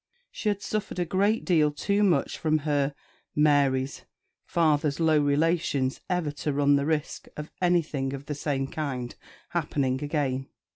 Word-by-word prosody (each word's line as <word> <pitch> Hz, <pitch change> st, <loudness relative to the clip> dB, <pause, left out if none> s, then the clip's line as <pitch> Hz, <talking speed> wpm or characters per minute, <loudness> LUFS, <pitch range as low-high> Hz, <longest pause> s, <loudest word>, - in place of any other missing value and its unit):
She 215 Hz, -, -2 dB
had 200 Hz, -1 st, -2 dB
suffered 215 Hz, -4 st, -3 dB
a 175 Hz, -, 0 dB
great 200 Hz, +6 st, +1 dB
deal 160 Hz, -5 st, +4 dB
too 200 Hz, +7 st, 0 dB
much 195 Hz, -4 st, +2 dB
from 155 Hz, -1 st, +2 dB
her 145 Hz, -2 st, +1 dB, 0.4 s
(Mary's) 140 Hz, -3 st, +2 dB, 0.4 s
father's 150 Hz, -3 st, +1 dB
low 160 Hz, -2 st, +4 dB
relations 145 Hz, -2 st, +1 dB
ever 180 Hz, -5 st, 0 dB
to 150 Hz, +1 st, -3 dB
run 145 Hz, 0 st, +3 dB
the 140 Hz, +1 st, 0 dB
risk 155 Hz, -2 st, -2 dB
of 150 Hz, +1 st, -6 dB
anything 160 Hz, -7 st, +1 dB
of 140 Hz, 0 st, -7 dB
the 150 Hz, -, -3 dB
same 140 Hz, -2 st, -1 dB
kind 135 Hz, -4 st, -4 dB, 0.4 s
happening 140 Hz, -5 st, -1 dB
again. 135 Hz, -3 st, -1 dB
150 Hz, 150 wpm, -27 LUFS, 140-165 Hz, 0.4 s, deal